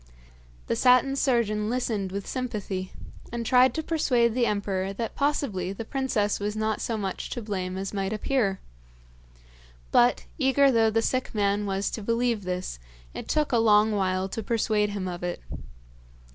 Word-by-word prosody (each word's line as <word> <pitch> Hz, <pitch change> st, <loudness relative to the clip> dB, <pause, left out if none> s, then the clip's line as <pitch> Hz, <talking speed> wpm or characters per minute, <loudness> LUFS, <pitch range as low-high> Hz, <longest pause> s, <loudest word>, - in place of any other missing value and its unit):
The -, -, -1 dB
Satin 255 Hz, +2 st, +4 dB
Surgeon 225 Hz, -6 st, +1 dB
listened 225 Hz, -6 st, -1 dB
with 200 Hz, +1 st, -4 dB
sympathy, 205 Hz, -7 st, -4 dB, 0.4 s
and 235 Hz, 0 st, -3 dB
tried 255 Hz, +2 st, +5 dB
to 315 Hz, -, -2 dB
persuade 250 Hz, -8 st, +2 dB
the 240 Hz, -1 st, +2 dB
emperor 195 Hz, -2 st, -1 dB
that 225 Hz, +2 st, -4 dB
possibly 230 Hz, -11 st, -1 dB
the 225 Hz, +3 st, -6 dB
princess 230 Hz, -6 st, 0 dB
was 205 Hz, +1 st, -2 dB
not 220 Hz, 0 st, -1 dB
so 230 Hz, -, -2 dB
much 195 Hz, -3 st, -4 dB
to 240 Hz, -, -4 dB
blame 185 Hz, -3 st, -3 dB
as 195 Hz, +1 st, -4 dB
might 195 Hz, -1 st, -2 dB
appear; 215 Hz, -3 st, 0 dB, 1.3 s
but, 240 Hz, +1 st, +4 dB
eager 275 Hz, 0 st, +4 dB
though 225 Hz, -2 st, +4 dB
the 225 Hz, +1 st, +1 dB
sick 255 Hz, -1 st, -1 dB
man 205 Hz, 0 st, +1 dB
was 195 Hz, 0 st, -1 dB
to 220 Hz, -, -4 dB
believe 230 Hz, -1 st, 0 dB
this, 180 Hz, -, -4 dB, 0.3 s
it -, -, -7 dB
took 305 Hz, -1 st, +1 dB
a 235 Hz, -, +3 dB
long 215 Hz, -1 st, +5 dB
while 190 Hz, -2 st, 0 dB
to 225 Hz, -, -4 dB
persuade 215 Hz, -1 st, +1 dB
him 200 Hz, -2 st, -4 dB
of 175 Hz, -1 st, -5 dB
it. 175 Hz, 0 st, -3 dB
215 Hz, 165 wpm, -26 LUFS, 195-245 Hz, 1.3 s, tried